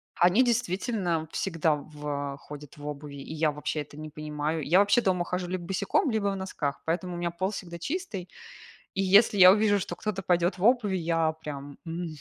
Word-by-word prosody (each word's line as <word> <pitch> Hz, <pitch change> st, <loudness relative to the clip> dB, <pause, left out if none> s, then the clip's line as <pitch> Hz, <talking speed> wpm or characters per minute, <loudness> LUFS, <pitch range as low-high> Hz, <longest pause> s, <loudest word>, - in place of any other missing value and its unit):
Они 180 Hz, +9 st, +5 dB
действительно 195 Hz, -7 st, 0 dB
всегда 165 Hz, -4 st, +1 dB
в 145 Hz, -1 st, -5 dB
ходят 150 Hz, 0 st, -11 dB
в 145 Hz, -, -10 dB
обуви, 145 Hz, -1 st, -6 dB
и 140 Hz, +2 st, -8 dB
я 155 Hz, -1 st, +1 dB
вообще 150 Hz, +1 st, -3 dB
это 145 Hz, 0 st, -11 dB
не 155 Hz, 0 st, -7 dB
понимаю. 150 Hz, +1 st, -3 dB
Я 165 Hz, +6 st, +3 dB
вообще 205 Hz, +4 st, +4 dB
дома 180 Hz, -4 st, +1 dB
хожу 180 Hz, 0 st, -3 dB
либо 180 Hz, 0 st, -3 dB
босиком, 195 Hz, +7 st, +1 dB
либо 215 Hz, -2 st, 0 dB
в 200 Hz, -, 0 dB
носках, 165 Hz, -7 st, -3 dB
поэтому 175 Hz, +2 st, -2 dB
у -, -, -5 dB
меня 175 Hz, -1 st, -2 dB
пол 185 Hz, +3 st, -1 dB
всегда 170 Hz, -4 st, -7 dB
чистый. 255 Hz, -, -4 dB, 0.6 s
И 195 Hz, -, 0 dB
если 200 Hz, +2 st, +5 dB
я 185 Hz, 0 st, +10 dB
увижу, 205 Hz, 0 st, +3 dB
что 190 Hz, -, -4 dB
кто-то 210 Hz, -3 st, -3 dB
пойдет 175 Hz, +1 st, +2 dB
в 180 Hz, -, -5 dB
обуви, 225 Hz, -4 st, +3 dB
я 165 Hz, -2 st, +1 dB
прям, 145 Hz, -3 st, -8 dB
м, 170 Hz, +1 st, -4 dB
175 Hz, 195 wpm, -28 LUFS, 150-195 Hz, 0.6 s, я